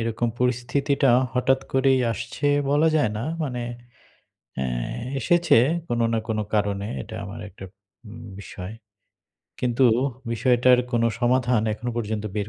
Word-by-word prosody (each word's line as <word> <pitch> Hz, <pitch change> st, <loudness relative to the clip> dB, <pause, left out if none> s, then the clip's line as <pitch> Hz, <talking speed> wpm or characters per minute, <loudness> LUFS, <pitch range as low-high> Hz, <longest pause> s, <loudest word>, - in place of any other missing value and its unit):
এরকম 115 Hz, +1 st, -1 dB
পরিস্থিতিটা 125 Hz, +2 st, +1 dB, 0.2 s
হঠাৎ 130 Hz, +1 st, +2 dB
করেই 135 Hz, 0 st, +3 dB
আসছে 120 Hz, +6 st, -4 dB, 0.2 s
বলা 150 Hz, +3 st, +4 dB
যায় 145 Hz, -9 st, +2 dB
না। 115 Hz, -, -3 dB, 0.2 s
মানে 125 Hz, -5 st, -3 dB, 0.9 s
অ্যা 65 Hz, -, -1 dB, 0.5 s
এসেছে 175 Hz, +2 st, +4 dB, 0.3 s
কোন 120 Hz, 0 st, -1 dB
না 115 Hz, -, +1 dB
কোন 110 Hz, -1 st, -1 dB, 0.2 s
কারণে 100 Hz, -1 st, 0 dB, 0.2 s
এটা -, -, -10 dB
আমার 100 Hz, +3 st, -8 dB
একটা 95 Hz, 0 st, -12 dB, 0.4 s
উম 105 Hz, +2 st, -10 dB, 0.2 s
বিষয়। 95 Hz, +1 st, -8 dB, 0.9 s
কিন্তু 125 Hz, +1 st, +2 dB, 0.5 s
বিষয়টার 125 Hz, +1 st, +4 dB
কোন 120 Hz, -, +2 dB, 0.2 s
সমাধান 125 Hz, -2 st, +2 dB
এখনও 120 Hz, +3 st, -4 dB
পর্যন্ত 110 Hz, -2 st, -2 dB
বের 105 Hz, -1 st, -2 dB
120 Hz, 130 wpm, -24 LUFS, 110-130 Hz, 0.9 s, বলা